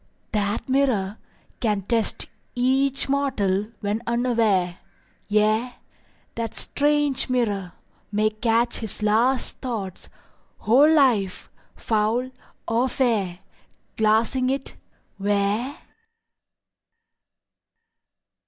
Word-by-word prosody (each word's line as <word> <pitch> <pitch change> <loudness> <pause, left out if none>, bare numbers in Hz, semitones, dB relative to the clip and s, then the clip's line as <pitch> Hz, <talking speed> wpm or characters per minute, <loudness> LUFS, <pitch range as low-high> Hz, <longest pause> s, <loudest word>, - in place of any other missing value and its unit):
That 210 +1 -1
mirror 250 -7 0 0.4
Can 210 -5 0
test 225 +2 +2 0.3
each 265 +2 +2
mortal 220 -8 0
when 210 +2 -2
unaware; 225 -7 +1 0.5
Yea, 215 +4 +1 0.6
that 230 -2 -4
strange 290 -2 +1
mirror 205 -8 -1 0.4
May 215 +1 +1
catch 230 +2 +1
his 220 -1 +1
last 235 +5 +2
thoughts, 210 -8 -5 0.5
whole 275 +8 +4
life 240 -11 +2 0.2
foul 225 +4 -1 0.4
or 235 +3 +1
fair, 210 -9 0 0.5
Glassing 220 +4 +3
it—where? 210 - -3
225 Hz, 80 wpm, -23 LUFS, 205-255 Hz, 0.6 s, whole